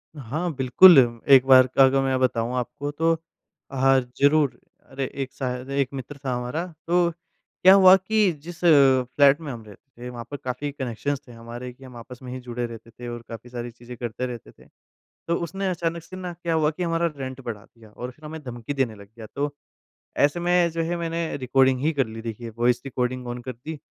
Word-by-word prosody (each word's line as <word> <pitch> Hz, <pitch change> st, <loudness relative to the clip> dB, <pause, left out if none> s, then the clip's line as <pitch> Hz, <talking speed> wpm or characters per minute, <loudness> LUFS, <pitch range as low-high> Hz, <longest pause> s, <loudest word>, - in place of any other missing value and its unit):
हाँ, 155 Hz, +6 st, -3 dB
बिल्कुल, 140 Hz, +7 st, +7 dB, 0.3 s
एक 135 Hz, -2 st, +7 dB
बार 130 Hz, -1 st, +7 dB
का 135 Hz, -, +7 dB
अगर 135 Hz, +1 st, +3 dB
मैं 135 Hz, -1 st, 0 dB
बताऊँ 120 Hz, -1 st, 0 dB
आपको 140 Hz, +4 st, -4 dB
तो 165 Hz, +3 st, +1 dB, 0.6 s
हाँ, 135 Hz, 0 st, +4 dB, 0.2 s
ज़रूर, 145 Hz, -1 st, +3 dB, 0.3 s
अरे 135 Hz, 0 st, -4 dB, 0.2 s
एक 130 Hz, -, -9 dB
शायद 130 Hz, -1 st, -4 dB
एक 140 Hz, -1 st, 0 dB
मित्र 135 Hz, +2 st, -7 dB
था 130 Hz, -, 0 dB
हमारा 125 Hz, +8 st, -3 dB, 0.2 s
तो 175 Hz, 0 st, +3 dB, 0.5 s
क्या 185 Hz, +1 st, +9 dB
हुआ 190 Hz, -1 st, +8 dB
कि 205 Hz, +1 st, +2 dB
जिस 170 Hz, +1 st, -9 dB
फ्लैट 140 Hz, -1 st, +5 dB
में 150 Hz, -3 st, -5 dB
हम 115 Hz, -3 st, -8 dB
रहते 120 Hz, +4 st, -17 dB
थे 125 Hz, -, -6 dB
वहाँ 120 Hz, -1 st, -7 dB
पर 145 Hz, -, -4 dB
काफ़ी 130 Hz, +3 st, -3 dB
कनेक्शंस 135 Hz, +1 st, -3 dB
थे -, -, -12 dB
हमारे 120 Hz, +2 st, -8 dB
कि 135 Hz, -, -18 dB
हम 130 Hz, -2 st, -12 dB
आपस 120 Hz, +1 st, -11 dB
में 125 Hz, -, -7 dB
ही 130 Hz, -, -5 dB
जुड़े 120 Hz, -1 st, -4 dB
रहते 115 Hz, -1 st, -10 dB
थे 120 Hz, +1 st, -10 dB
और 120 Hz, 0 st, -6 dB
काफ़ी 115 Hz, +1 st, -9 dB
सारी 120 Hz, -1 st, -6 dB
चीज़ें 120 Hz, +1 st, -11 dB
करते 120 Hz, +1 st, -4 dB
रहते 120 Hz, -3 st, -8 dB
थे। -, -, -21 dB, 0.6 s
तो 170 Hz, -, +2 dB
उसने 195 Hz, +4 st, -3 dB
अचानक 170 Hz, -2 st, -2 dB
से 185 Hz, -, -11 dB
न 180 Hz, -1 st, -5 dB
क्या 170 Hz, -1 st, 0 dB
हुआ 155 Hz, -1 st, +2 dB
कि 160 Hz, +3 st, -6 dB
हमारा 170 Hz, 0 st, +1 dB
रेंट 130 Hz, -1 st, -6 dB
बढ़ा 110 Hz, -5 st, -6 dB
दिया 115 Hz, -2 st, -19 dB
और 125 Hz, +4 st, -7 dB
फिर 155 Hz, +5 st, -19 dB
हमें 160 Hz, +1 st, -7 dB
धमकी 120 Hz, 0 st, -6 dB
देने 130 Hz, -5 st, 0 dB
लग 100 Hz, -1 st, -14 dB
गया 110 Hz, -2 st, -9 dB
तो, 145 Hz, +1 st, -2 dB, 0.6 s
ऐसे 145 Hz, +4 st, +2 dB
में 175 Hz, 0 st, +3 dB
जो 165 Hz, +1 st, -2 dB
है 170 Hz, +2 st, -2 dB
मैंने 165 Hz, -1 st, -3 dB
रिकॉर्डिंग 130 Hz, 0 st, +2 dB
ही 155 Hz, +3 st, +2 dB
कर 135 Hz, -5 st, 0 dB
ली 110 Hz, 0 st, -8 dB
देखिए 115 Hz, +1 st, -6 dB
वॉइस 120 Hz, +1 st, +2 dB
रिकॉर्डिंग 125 Hz, -1 st, -3 dB
ऑन 120 Hz, 0 st, -5 dB
कर 130 Hz, -, -6 dB
दी 150 Hz, +6 st, -8 dB
130 Hz, 215 wpm, -24 LUFS, 120-155 Hz, 0.6 s, क्या